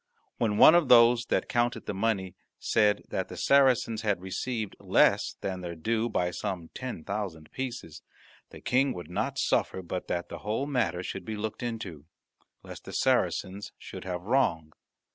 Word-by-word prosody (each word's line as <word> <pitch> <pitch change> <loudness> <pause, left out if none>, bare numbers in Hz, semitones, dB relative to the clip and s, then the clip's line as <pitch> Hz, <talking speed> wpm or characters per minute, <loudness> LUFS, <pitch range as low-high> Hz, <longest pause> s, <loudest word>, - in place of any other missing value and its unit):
When 105 -3 +1
one 155 - +9
of 170 -4 +4
those 115 -1 +6
that - - 0
counted 120 0 0
the - - -3
money 95 -3 -1 0.2
said 105 -2 +2
that - - -2
the - - -9
Saracens 130 -5 +3
had 105 -4 0
received 105 +3 -4
less - - +3
than 95 -1 -3
their 85 -1 -5
due 115 +8 -1
by 90 -4 0
some 90 -2 -5
ten 125 -11 -6
thousand 95 -6 -5
pieces, 125 - -6 0.5
the - - -12
King 130 +2 +2
would 90 -1 -8
not 115 +9 -2
suffer 95 - 0
but 90 +1 -5
that 85 0 -2
the - - -8
whole 110 +6 -2
matter 115 - -1
should 95 0 -5
be 110 +3 -5
looked 110 0 -4
into, 105 -11 -5 0.6
lest - - -10
the - - -8
Saracens 100 +2 0
should - - -9
have 90 -1 -4
wrong. 85 - +1
105 Hz, 170 wpm, -28 LUFS, 90-120 Hz, 0.6 s, one